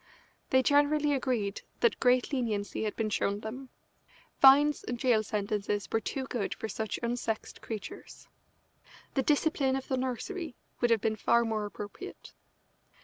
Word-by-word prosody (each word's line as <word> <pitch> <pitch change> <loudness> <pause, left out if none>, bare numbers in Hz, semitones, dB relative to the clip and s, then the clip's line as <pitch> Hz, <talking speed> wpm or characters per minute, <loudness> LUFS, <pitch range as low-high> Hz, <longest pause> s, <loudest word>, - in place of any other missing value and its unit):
They 260 0 +4
generally 290 +1 +3
agreed 240 -7 -1 0.2
that 470 - +3
great 250 +2 +3
leniency 220 -5 -1
had 210 - -2
been 215 -2 -1
shown 200 -1 0
them. 255 +5 -7 0.7
Fines 285 +2 +7
and 245 - -3
jail 235 -3 +3
sentences 205 -1 -2
were 225 - +2
too 265 +5 -3
good 235 -6 -3
for - - -5
such 220 0 -3
unsexed 235 -2 -3
creatures. 220 -3 -8 0.9
"The 270 - +2
discipline 285 -1 +2
of 270 - -5
the 260 - +1
nursery" 260 - -3 0.2
would 240 - +2
have 230 -3 +3
been 220 0 0
far 235 +2 +3
more 215 -2 -1
appropriate. 205 0 -9
240 Hz, 145 wpm, -30 LUFS, 215-270 Hz, 0.9 s, Fines